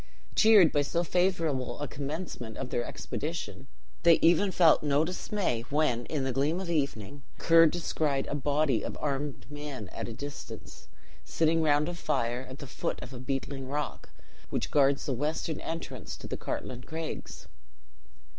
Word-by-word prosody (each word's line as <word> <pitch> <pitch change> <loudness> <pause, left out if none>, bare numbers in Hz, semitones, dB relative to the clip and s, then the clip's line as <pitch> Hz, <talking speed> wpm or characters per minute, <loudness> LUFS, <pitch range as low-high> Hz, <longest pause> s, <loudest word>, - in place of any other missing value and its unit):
Cheered 210 -7 +7
by 145 - +2
so 170 +4 0
favourable 165 -8 0
a 145 - -2
commencement 140 -6 -5
of 130 - -5
their 120 - 0
expedition, 150 -1 -5 0.3
they 170 -1 +7
even 175 +5 +4
felt 170 -4 +5
no 145 +1 +2
dismay 180 - -1
when, 140 -5 +1
in 150 -4 -1
the 130 - 0
gloom 145 +7 +1
of 190 - -4
the 170 -1 -1
evening, 140 -2 -2 0.2
Ker 165 0 +6
descried 155 -4 0
a - - -4
body 145 -3 +1
of - - -5
armed 145 -1 -2
men 145 -8 -6
at - - -5
a 115 - -5
distance, 145 +3 -8 0.4
sitting 165 - +2
round 150 -1 +3
a 175 - -2
fire 125 -6 -1
at 130 - -8
the 140 - -8
foot - - -3
of 130 - -9
a 125 - -7
beetling 135 0 -3
rock 145 +2 -4 0.4
which - - -2
guards 140 -1 +3
the 135 - 0
western 150 +4 -2
entrance 135 - -5
to - - -10
the - - -3
Cartlane 125 -1 -4
Craigs. 160 +3 -6
145 Hz, 165 wpm, -29 LUFS, 135-165 Hz, 0.4 s, Cheered